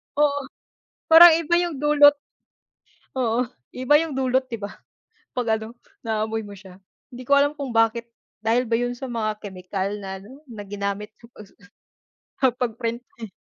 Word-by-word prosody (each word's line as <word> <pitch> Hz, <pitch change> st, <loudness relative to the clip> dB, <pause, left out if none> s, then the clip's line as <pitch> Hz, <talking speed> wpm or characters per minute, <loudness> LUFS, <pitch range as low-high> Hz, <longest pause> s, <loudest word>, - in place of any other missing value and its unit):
Oo, 285 Hz, -1 st, +1 dB, 0.6 s
parang 335 Hz, +2 st, +10 dB
iba 335 Hz, 0 st, -2 dB
yung 345 Hz, -5 st, -3 dB
dulot. 290 Hz, 0 st, +5 dB, 1.0 s
Oo, 240 Hz, -1 st, 0 dB, 0.2 s
iba 255 Hz, +4 st, +3 dB
yung 320 Hz, -1 st, -2 dB
dulot 260 Hz, 0 st, 0 dB
'di 230 Hz, -4 st, -7 dB
ba 200 Hz, -, -4 dB, 0.7 s
'pag 230 Hz, -3 st, 0 dB
ano, 220 Hz, +2 st, -9 dB, 0.3 s
naaamoy 220 Hz, 0 st, -2 dB
mo 205 Hz, -, -10 dB
siya. 190 Hz, -2 st, -14 dB, 0.3 s
Hindi 250 Hz, 0 st, -10 dB
ko 280 Hz, -, +4 dB
alam 290 Hz, +1 st, +2 dB
kung 270 Hz, -5 st, -5 dB
bakit 225 Hz, +1 st, +2 dB, 0.3 s
dahil 230 Hz, +2 st, 0 dB
ba 230 Hz, -, +2 dB
yun 245 Hz, 0 st, -2 dB
sa 255 Hz, +1 st, -7 dB
mga 215 Hz, -2 st, -3 dB
kemikal 190 Hz, +1 st, -4 dB
na 195 Hz, -1 st, -7 dB
ano 265 Hz, +9 st, -15 dB
na 220 Hz, -5 st, -9 dB
ginamit 200 Hz, +1 st, -4 dB
sa 235 Hz, -, -16 dB
pagsusu 215 Hz, -4 st, -16 dB, 0.8 s
sa 265 Hz, -, +5 dB
pag-print 235 Hz, 0 st, -3 dB, 0.2 s
eh. 220 Hz, -, -6 dB
235 Hz, 160 wpm, -23 LUFS, 215-265 Hz, 1.0 s, parang